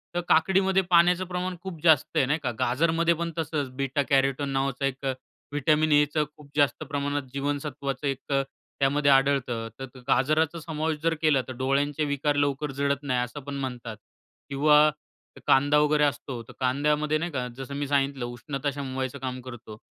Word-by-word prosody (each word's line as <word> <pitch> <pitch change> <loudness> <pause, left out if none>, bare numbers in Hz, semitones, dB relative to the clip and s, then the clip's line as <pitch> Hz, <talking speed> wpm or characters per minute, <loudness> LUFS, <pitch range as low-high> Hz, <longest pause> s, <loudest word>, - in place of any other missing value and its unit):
तर 175 - +1
काकडीमध्ये 190 +3 +4
पाण्याचं 175 +1 +4
प्रमाण 180 0 -3
खूप 175 -5 -7
जास्त 160 -5 +4
आहे - - +4
नाही 150 +5 0
का? 125 - 0
गाजरमध्ये 165 +6 +2
पण 170 0 -2
तसंच 145 -4 -2
बेटा 135 +1 0
कॅरोटीन 135 +1 +2
नावाचा 135 0 -1
एक 135 0 -3 0.5
व्हिटॅमिन 150 +2 +2
एच 145 +1 +3
खूप 150 -1 -3
जास्त 145 -2 +2
प्रमाणात 145 0 -1
जीवनसत्वाचं 140 -1 -3
एक 135 -1 -1
त्यामध्ये 140 +1 0
आढळतं. 135 -4 +2
तर 135 - -4 0.2
गाजराचा 155 +5 +2
समावेश 155 -1 -3
जर 165 0 +2
केला 150 -4 +3
तर 130 - -5
डोळ्यांचे 140 +3 0
विकार 145 +1 0
लवकर 145 0 0
जळत 140 0 0
नाही 130 -3 0
असं 125 +4 -7
पण 140 0 -6
म्हणतात. 120 -4 -5 0.5
किंवा 150 +2 +5 0.6
कांदा 145 +2 +4
वगैरे 150 0 +3
असतो. 140 -4 -1
तर - - -14
कांद्यामध्ये 150 +4 +1
नाही 170 +2 -3
का 125 -3 -2
जसं 135 +1 -7
मी 145 0 -2
सांगितलं 135 -2 0
उष्णता 135 +4 -4
शमवायचं 135 -1 -4
काम 130 -1 -4
करतो. 120 -4 -10
145 Hz, 165 wpm, -26 LUFS, 135-150 Hz, 0.6 s, किंवा